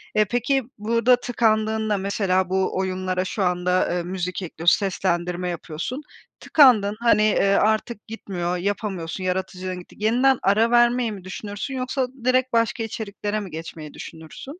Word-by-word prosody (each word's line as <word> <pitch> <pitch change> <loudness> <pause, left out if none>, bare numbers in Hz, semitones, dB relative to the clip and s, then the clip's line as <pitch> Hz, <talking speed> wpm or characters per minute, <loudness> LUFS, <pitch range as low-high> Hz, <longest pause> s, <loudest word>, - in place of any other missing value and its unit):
Eee, 215 - +4
peki 245 +5 0
burda 230 +3 +3
tıkandığında 220 -3 0
mesela 190 -1 0
bu 190 0 0
oyunlara 185 -1 -1
şu 195 +2 -2
anda, 180 0 +1
eee, 175 -1 -1
müzik 180 +1 -4
ekliyor, 170 -1 -7
seslendirme 180 -2 +1
yapıyorsun. 175 - -5 0.4
Tıkandın 220 -9 +5
hani, 235 -2 +4
eee, 215 -1 +3
artık 215 +1 0
gitmiyor, 180 -5 -3
yapamıyorsun, 190 -2 -3
yaratıcılığın 185 0 -3
gitti. 180 - -14
Yeniden 245 +5 +3
ara 220 +4 +3
vermeyi 240 -1 +3
mi 200 -3 -8
düşünürsün 205 +6 -6
yoksa 255 0 -1 0.2
direkt 255 0 +2
başka 230 0 +1
içeriklere 215 -1 -4
mi 195 -4 -7
geçmeyi 160 -1 -8
düşünürsün? 160 - -10
205 Hz, 140 wpm, -23 LUFS, 185-230 Hz, 0.4 s, Tıkandın